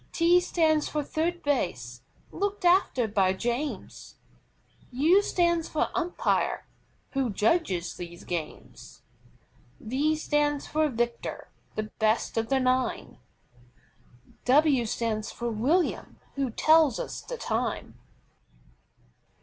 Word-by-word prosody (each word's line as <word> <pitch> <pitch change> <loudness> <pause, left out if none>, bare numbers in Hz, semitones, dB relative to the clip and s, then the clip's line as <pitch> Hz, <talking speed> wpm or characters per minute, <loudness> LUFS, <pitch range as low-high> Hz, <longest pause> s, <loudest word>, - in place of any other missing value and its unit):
T 345 +1 +4
stands 315 -4 +1
for 300 -1 -2
THIRD 340 +4 -2
BASE, 125 - -2 0.3
looked 405 -1 -3
after 345 - +3
by 195 -3 +2
James. 240 +8 -4 0.8
U 315 +10 +4
stands 345 -4 +1
for 310 - -1
UMPIRE, 355 -1 0 0.5
who 270 -3 0
judges 210 - 0
these 175 0 -9
games. 165 -3 -7 0.8
V 280 +7 0
stands 295 -2 0
for 310 0 +1
VICTOR, 235 -1 -3 0.3
the 215 0 -4
best 220 +1 +1
of 225 0 -1
the 270 -1 +2
nine. 255 -1 -1 1.3
W 270 -2 +4
stands 215 -1 -2
for 240 0 -4
WILLIAM, 280 +12 0 0.2
who 275 -2 -1
tells 310 +2 +4
us - - -5
the - - -7
time. 230 - -2
270 Hz, 110 wpm, -27 LUFS, 225-320 Hz, 1.3 s, T